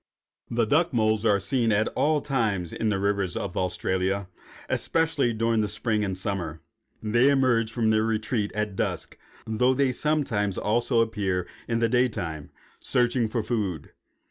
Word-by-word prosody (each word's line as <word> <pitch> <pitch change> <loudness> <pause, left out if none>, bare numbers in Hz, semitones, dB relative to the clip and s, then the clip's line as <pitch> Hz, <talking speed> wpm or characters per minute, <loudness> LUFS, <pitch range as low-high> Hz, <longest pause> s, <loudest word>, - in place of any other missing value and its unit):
The 115 -1 +1
duck 160 +7 +2
moles 110 -1 +2
are 105 -2 +4
seen 115 +4 +1
at 105 +1 +2
all 150 0 +1
times 110 - -1
in 110 - -1
the 105 - +1
rivers 100 -2 0
of 95 - -4
Australia, 95 +1 -1 0.4
especially 160 -6 +1
during 115 0 +1
the 105 - 0
spring 105 +1 -1
and 95 -2 -2
summer. 90 -5 -3 0.4
They 120 +5 +4
emerge 125 -5 +2
from 115 -2 +1
their 110 0 +3
retreats 110 -1 -1
at 105 -2 -2
dusk, - - -2 0.3
though 125 +4 +2
they 135 -1 +2
sometimes 125 -9 0
also 115 +2 +2
appear 100 -5 -1 0.2
in 115 - 0
the 115 0 +2
day 125 +2 +3
time, 80 -8 -5 0.3
searching 120 -2 +1
for 115 0 -1
food. 100 - -3
110 Hz, 160 wpm, -26 LUFS, 100-120 Hz, 0.4 s, are